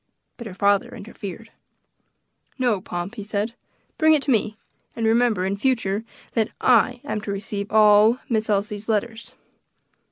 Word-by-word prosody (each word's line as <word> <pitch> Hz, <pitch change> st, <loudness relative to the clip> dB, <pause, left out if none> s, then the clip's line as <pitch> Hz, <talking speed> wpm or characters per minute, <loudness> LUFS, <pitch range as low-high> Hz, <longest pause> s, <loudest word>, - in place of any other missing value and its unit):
But 235 Hz, -, -8 dB
her 185 Hz, -, -9 dB
father 200 Hz, 0 st, +1 dB
interfered. 210 Hz, 0 st, -9 dB, 1.1 s
"No, 240 Hz, -7 st, +1 dB
Pomp," 175 Hz, +3 st, -5 dB
he 230 Hz, -, -7 dB
said, 210 Hz, +2 st, -3 dB, 0.5 s
"bring 315 Hz, 0 st, +5 dB
it 290 Hz, -, -1 dB
to 280 Hz, -, 0 dB
me; 215 Hz, -2 st, 0 dB, 0.4 s
and 230 Hz, -, -2 dB
remember, 225 Hz, -4 st, +2 dB
in 195 Hz, +1 st, -2 dB
future, 225 Hz, -4 st, 0 dB, 0.3 s
that 220 Hz, -2 st, +1 dB
I 250 Hz, 0 st, +3 dB
am 220 Hz, -7 st, -3 dB
to 210 Hz, -, -5 dB
receive 200 Hz, 0 st, -5 dB
all 215 Hz, +2 st, +6 dB
Miss 220 Hz, -4 st, -1 dB
Elsie's 210 Hz, +1 st, -1 dB
letters." 225 Hz, +1 st, -2 dB
215 Hz, 150 wpm, -23 LUFS, 200-235 Hz, 1.1 s, all